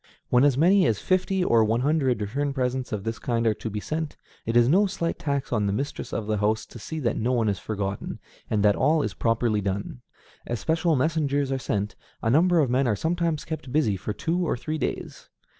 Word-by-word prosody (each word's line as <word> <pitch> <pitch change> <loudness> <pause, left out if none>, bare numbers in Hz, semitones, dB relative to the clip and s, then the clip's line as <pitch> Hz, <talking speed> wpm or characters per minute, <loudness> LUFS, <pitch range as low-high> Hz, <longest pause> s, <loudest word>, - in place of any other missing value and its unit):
When 125 +1 +4
as 140 -3 +4
many 180 +3 +5
as 110 - +1
fifty 185 - +1
or 115 -9 +4
one 110 +2 +1
hundred 135 -5 +1
return 140 +7 -2
presents 130 -1 -2
of 105 -3 -3
this 115 +1 -3
kind 115 -1 -1
are 110 - +4
to 110 - -6
be 105 0 -3
sent, 155 +6 -4 0.3
it 115 +1 +2
is 120 0 +5
no 195 +9 +4
slight 170 -4 -3
tax 140 -6 -2
on 105 -3 +1
the - - +1
mistress 140 +7 -4
of 110 - -3
the 110 0 0
house 105 +2 0
to 120 - -12
see 160 +9 -6
that 115 -4 0
no 120 +3 0
one 115 -3 +1
is 100 -3 0
forgotten, 100 -2 -4 0.3
and 105 -2 +1
that 105 -1 +5
all 150 +3 +2
is - - -2
properly 115 -2 +1
done. 95 -10 -3 0.5
As 120 -1 -2
special 165 0 +1
messengers 145 -1 +1
are 135 - 0
sent, 105 -4 -2 0.3
a 115 - +2
number 170 +4 +4
of 135 - +1
men 130 +1 +2
are 110 - +2
sometimes 165 - -1
kept 155 -5 -6
busy 125 -8 +2
for 100 +3 -4
two 165 +11 -1
or 160 - 0
three 155 +5 -4
days. 125 - -4
125 Hz, 225 wpm, -25 LUFS, 110-155 Hz, 0.5 s, many